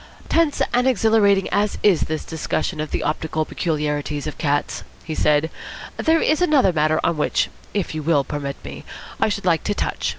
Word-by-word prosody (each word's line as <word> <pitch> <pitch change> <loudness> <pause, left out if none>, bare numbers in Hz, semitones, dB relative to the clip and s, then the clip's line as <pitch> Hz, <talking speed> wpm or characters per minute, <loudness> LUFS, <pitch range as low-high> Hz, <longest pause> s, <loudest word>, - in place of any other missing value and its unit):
"Tense 325 -3 +2
and 245 +1 +3
exhilarating 215 -4 +3
as 205 0 0
is 195 -6 +5
this 155 0 -2
discussion 160 +1 -2
of 155 - -4
the - - -2
optical 155 +1 -1
peculiarities 150 -3 -2
of 150 - -6
cats," 145 -2 -1 0.2
he 160 - -5
said, 150 +1 +2 0.5
"there 325 0 +2
is 310 +3 +2
another 285 - +4
matter 155 0 +2
on 170 - +1
which, 150 - +1 0.2
if 200 -5 -1
you 155 - -3
will 150 -2 +2
permit 140 0 -4
me, - - -8 0.4
I - - +3
should 200 -1 -3
like 165 -3 +2
to 205 - 0
touch. - - -2
160 Hz, 185 wpm, -21 LUFS, 150-210 Hz, 0.5 s, is